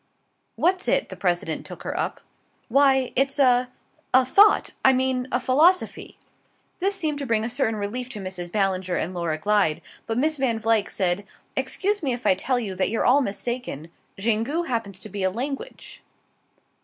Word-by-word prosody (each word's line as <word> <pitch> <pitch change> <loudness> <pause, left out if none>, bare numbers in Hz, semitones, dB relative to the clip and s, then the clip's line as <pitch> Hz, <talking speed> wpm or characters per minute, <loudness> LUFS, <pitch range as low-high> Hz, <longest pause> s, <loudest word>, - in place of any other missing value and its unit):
"What's 365 +2 +1
it?" - - +1
the - - -7
President 175 -3 -1
took - - -10
her - - -4
up. - - -3 0.5
"Why 265 0 +3
it's 270 +2 +1
a 250 -2 +4 0.5
a 260 0 +6
Thought: 405 +11 +5
I 265 - +6
mean 260 -1 0
a 245 - +1
philosophy." 310 +9 +2 0.6
This 395 +2 0
seemed 310 -6 -2
to 280 - -3
bring 225 -2 +1
a - - -2
certain 245 -3 0
relief 220 +5 -4
to 215 - -7
Mrs. 185 -2 -6
Ballinger 190 -3 0
and 175 +4 -2
Laura 170 -3 -2
Glyde, 195 -3 +1 0.3
but 225 - -2
Miss 310 +4 +1
Van 255 -4 0
Vluyck 220 -2 +1
said: 185 0 -1 0.3
"Excuse 390 +10 -1
me 270 -5 0
if 245 +1 -7
I - - +5
tell 245 +7 -1
you 210 -5 -4
that 185 0 0
you're 225 - -1
all 270 +4 +5
mistaken. 210 - -4 0.3
Xingu 230 - 0
happens 225 - -3
to - - -6
be 200 0 -5
a 190 - +2
language." 275 - -6
240 Hz, 180 wpm, -24 LUFS, 195-270 Hz, 0.6 s, a